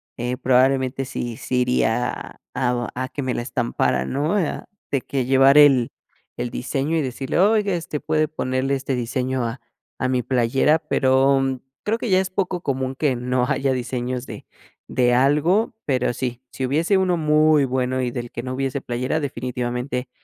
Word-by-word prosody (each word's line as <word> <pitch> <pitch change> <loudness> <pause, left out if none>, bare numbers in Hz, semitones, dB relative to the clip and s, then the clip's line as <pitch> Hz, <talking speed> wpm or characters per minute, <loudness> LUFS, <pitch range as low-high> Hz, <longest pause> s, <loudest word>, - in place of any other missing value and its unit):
eh, 125 +1 -3
probablemente 130 +1 +2
sí 120 -3 -5
sí 125 -1 -1
iría 125 -1 -1
a 125 -1 0 0.2
a 130 - -5
que 145 - -5
me 130 -2 -1
la - - -1
estampara, 120 - 0
¿no? 145 - -1
Ah, 180 -7 -1 0.2
de 140 - 0
que 130 -1 -2
llevar 135 +2 +5
el 135 -5 +5 0.5
el 120 - -2
diseño, 135 +6 -2
y - - +2
decirle: 130 -1 -3
"Oiga, 205 0 +3
este, 165 -3 -4
puede 155 0 +1
ponerle 135 -3 -1
este 135 0 -2
diseño 125 +1 -2
a 115 +3 -5 0.4
a 130 - 0
mi 130 -1 0
playera", 135 +5 +2
pero 135 -1 +2 0.2
creo 220 +2 0
que 235 - -3
ya 185 -1 +4
es 190 0 -1
poco 185 -2 -2
común 130 -3 -2
que 140 -2 +1
no 125 +1 0
haya 135 -2 0
diseños 125 0 -3
de - - -9 0.4
de 125 -1 +2
algo, 150 - +3
pero 130 -4 +1
sí, 125 0 -4
si 130 - -3
hubiese 160 +9 +2
uno 185 -2 +2
muy 155 -2 +4
bueno 130 0 -1
y 125 - 0
del 120 -1 -5
que - - -5
no 130 0 -4
hubiese 135 +1 -2
playera 125 +5 -2
definitivamente 125 -1 -3
130 Hz, 175 wpm, -22 LUFS, 125-145 Hz, 0.5 s, llevar